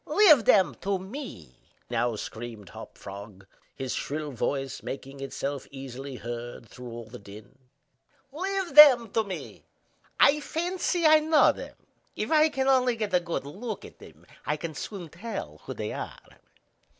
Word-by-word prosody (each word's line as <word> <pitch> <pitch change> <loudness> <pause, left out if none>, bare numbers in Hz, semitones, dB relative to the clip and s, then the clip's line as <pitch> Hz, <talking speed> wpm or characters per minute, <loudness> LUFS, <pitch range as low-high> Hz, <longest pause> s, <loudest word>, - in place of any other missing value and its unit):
"Leave 310 - +6
them 190 -3 +5
to 195 +1 0
me!" 190 - -9 0.3
now 120 -2 0
screamed 110 -2 -7
Hop - - -11
Frog, 100 0 -10 0.3
his 130 -2 -3
shrill 150 0 -3
voice 135 +2 -2
making 135 0 -7
itself 135 0 -4
easily 135 0 -7
heard 120 -1 -7
through 125 +1 -10
all 115 0 -7
the 115 +3 -11
din. 100 +4 -13 0.8
"Leave 380 +2 -2
them 260 -7 +9
to 225 - +2
me. 195 -3 -7 0.6
I 295 +2 +6
fancy 345 +2 -1
I 310 0 +8
know 310 0 +5
them. - - -9 0.4
If - - -3
I 310 0 +5
can 270 -3 -1
only 255 -2 +4
get 215 -3 -3
a 180 - +5
good 170 -5 -4
look 205 +8 -6
at - - -14
them, - - -15 0.2
I 150 - -1
can 160 +1 -5
soon 185 +1 -6
tell 165 - -6
who - - -6
they - - -4
are." - - -6
170 Hz, 160 wpm, -27 LUFS, -, 0.8 s, them